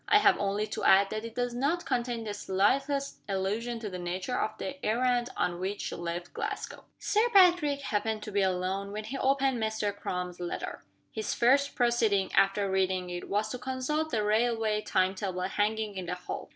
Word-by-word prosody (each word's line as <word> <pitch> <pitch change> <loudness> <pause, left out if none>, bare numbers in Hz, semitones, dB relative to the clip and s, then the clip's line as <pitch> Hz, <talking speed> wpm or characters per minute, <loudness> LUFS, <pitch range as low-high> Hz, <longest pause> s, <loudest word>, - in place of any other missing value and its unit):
I 420 - +6
have 415 - +4
only 200 +1 0
to 215 - -5
add, 195 +1 +5
that 215 0 -3
it 230 0 -8
does 245 -1 -1
not 285 +8 0
contain 240 -3 -1
the 210 -2 -4
slightest 275 +9 0
allusion 210 +5 -1
to 220 - -4
the 185 -2 -5
nature 185 +7 -3
of 215 - -1
the 280 0 -6
errand 245 +2 +1
on 175 -1 0
which 195 +2 -3
she - - -4
left 175 +1 -5
Glasgow." - - -5
Sir 435 +3 +2
Patrick 350 -8 +5
happened 215 -3 -1
to 210 - -6
be 200 0 +2
alone 190 +1 -1
when 215 +1 -4
he 245 +6 -5
opened 270 -2 +2
Mr. 220 -2 -1
Crum's 180 -2 -4
letter. 175 -1 -5 0.3
His 220 -1 -3
first 275 +4 +3
proceeding, 230 -6 +2
after 195 +1 +3
reading 185 -1 0
it, 175 0 -6
was 210 +2 0
to 250 - -5
consult 265 +5 -2
the 220 -6 0
railway 220 0 +1
time 185 -2 +1
table 185 -2 -3
hanging 210 +2 -1
in 185 -2 -5
the 180 - -2
hall. 180 - -6
215 Hz, 190 wpm, -29 LUFS, 190-250 Hz, 0.3 s, I